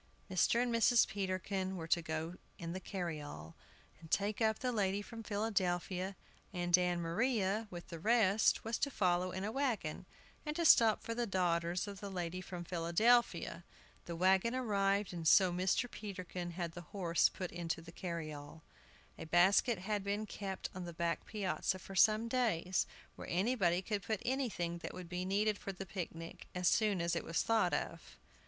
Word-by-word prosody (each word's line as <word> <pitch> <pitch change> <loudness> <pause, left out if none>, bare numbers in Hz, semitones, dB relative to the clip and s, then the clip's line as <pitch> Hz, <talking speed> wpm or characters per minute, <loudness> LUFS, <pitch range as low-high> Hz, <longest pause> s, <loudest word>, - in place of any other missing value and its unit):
Mr. 190 +5 +3
and 245 -1 -1
Mrs. 230 +1 +5
Peterkin 190 -1 -2
were 165 -1 -5
to 170 - +3
go 160 +1 -3 0.2
in 170 0 -5
the 185 - -4
carryall, 155 - -5 0.5
and 160 -1 -13
take 205 +5 0
up 220 -1 +3
the 250 - -1
lady 200 -3 +1
from 230 +1 -8
Philadelphia, 190 -3 -1 0.4
and 175 -1 +3
Ann 180 -1 +1
Maria, 210 +4 0
with 175 -2 -9
the 165 - -7
rest, 215 +1 +3
was 225 +1 -2
to 280 - +1
follow 180 -6 +1
in 185 +1 -4
a 210 - -2
wagon, 220 - -2 0.4
and 300 -1 -3
to 340 0 0
stop 225 -7 +6
for 230 - -3
the 240 0 -1
daughters 175 -1 0
of 200 -1 -7
the 200 - -6
lady 180 -1 -3
from 180 -1 -6
Philadelphia. 175 +2 +2 0.4
The 170 - -5
wagon 190 +7 +3
arrived, 200 -5 +1
and 165 -2 -3
so 185 +2 +6
Mr. 185 +7 +1
Peterkin 185 -5 -6
had 170 -1 -3
the 175 - -8
horse 175 -4 +2
put 185 -2 -6
into 170 -1 -3
the 165 0 -11
carryall. 160 -3 -6 0.6
A - - -6
basket 190 +7 +4
had 205 +2 -2
been 205 +2 -1
kept 195 -2 -5
on 185 -1 -6
the 170 - -7
back 170 -1 -2
piazza 195 -2 -1
for 190 +1 -10
some 215 +4 +5
days, 195 -8 +1 0.3
where - - -8
anybody 185 -2 +2
could 205 0 -2
put 215 0 -3
anything 225 -10 -1
that - - -7
would 180 -2 -8
be 180 0 -3
needed 205 +2 +1
for 195 - -5
the 195 0 -7
picnic 165 -3 -7
as 180 -1 +1
soon 205 -3 +3
as 170 +1 0
it - - -2
was 165 - 0
thought 225 -1 +2
of. - - -5
185 Hz, 180 wpm, -35 LUFS, 175-215 Hz, 0.6 s, stop